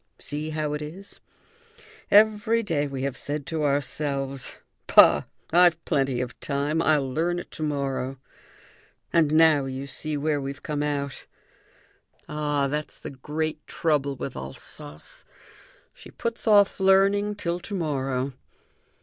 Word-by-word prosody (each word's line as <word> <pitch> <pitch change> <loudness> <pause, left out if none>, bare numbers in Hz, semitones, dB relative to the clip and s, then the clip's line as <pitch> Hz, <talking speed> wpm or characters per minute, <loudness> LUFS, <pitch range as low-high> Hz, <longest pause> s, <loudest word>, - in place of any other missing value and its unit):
See 150 +2 -4
how 155 -1 -2
it 150 - -3
is! 180 +7 -9 0.9
Every 215 +2 +4
day 150 -8 0
we 135 -1 -5
have 140 -2 -2
said 145 -1 -4
to 160 0 -2
ourselves: 140 -1 -2 0.3
'Bah! - - +7 0.3
I've 170 -1 +4
plenty 135 -3 +1
of 125 -1 -6
time. 145 +3 -1
I'll 150 -4 +2
learn 175 +4 0
it - - -7
to - - -9
morrow.' 135 -3 -2 1.0
And 160 -3 +4
now 155 -3 +5
you 135 +1 -5
see 150 +3 -4
where 145 0 0
we've 140 0 -6
come 150 -1 -2
out. 140 -2 -3 1.0
Ah, 150 -2 0
that's 150 +2 -4
the 155 - -7
great 150 +3 -4
trouble 145 -4 0
with 135 +1 -6
Alsace; 70 +3 -9 0.7
she - - -13
puts 235 0 -4
off 205 -2 +5
learning 195 +2 +4
till 175 -3 -2
to 200 +3 -6
morrow. 135 -5 -1
150 Hz, 135 wpm, -25 LUFS, 140-165 Hz, 1.0 s, Bah